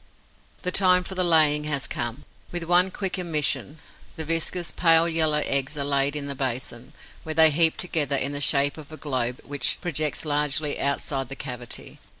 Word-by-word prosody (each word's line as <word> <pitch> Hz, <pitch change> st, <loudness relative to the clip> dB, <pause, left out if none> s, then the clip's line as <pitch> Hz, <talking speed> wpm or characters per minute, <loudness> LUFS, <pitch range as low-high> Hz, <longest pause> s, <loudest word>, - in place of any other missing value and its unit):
The 180 Hz, -, 0 dB
time 180 Hz, -1 st, +4 dB
for 190 Hz, -, -6 dB
the 185 Hz, -1 st, 0 dB
laying 155 Hz, -3 st, +5 dB
has 150 Hz, -3 st, 0 dB
come. 120 Hz, +3 st, -4 dB, 0.3 s
With 175 Hz, -1 st, -3 dB
one 180 Hz, +2 st, +3 dB
quick 190 Hz, 0 st, -5 dB
emission, 155 Hz, -3 st, -1 dB, 0.4 s
the 160 Hz, -, -5 dB
viscous, 165 Hz, +2 st, -1 dB
pale 165 Hz, -1 st, +4 dB
yellow 155 Hz, -2 st, +2 dB
eggs 140 Hz, +2 st, 0 dB
are 140 Hz, -, -1 dB
laid 140 Hz, 0 st, 0 dB
in 145 Hz, -1 st, -4 dB
the 140 Hz, -, -4 dB
basin, 125 Hz, -2 st, -5 dB, 0.3 s
where 155 Hz, -1 st, -6 dB
they 160 Hz, 0 st, +7 dB
heap 160 Hz, +2 st, +3 dB
together 150 Hz, -6 st, 0 dB
in 135 Hz, +1 st, 0 dB
the 145 Hz, 0 st, -4 dB
shape 145 Hz, +2 st, +2 dB
of 155 Hz, 0 st, -13 dB
a 155 Hz, -, -9 dB
globe 130 Hz, -5 st, -3 dB
which 140 Hz, -2 st, -2 dB
projects 155 Hz, -4 st, -2 dB
largely 150 Hz, 0 st, -1 dB
outside 140 Hz, -1 st, -2 dB
the 135 Hz, -, -5 dB
cavity. 125 Hz, -3 st, -7 dB
150 Hz, 180 wpm, -24 LUFS, 140-165 Hz, 0.4 s, they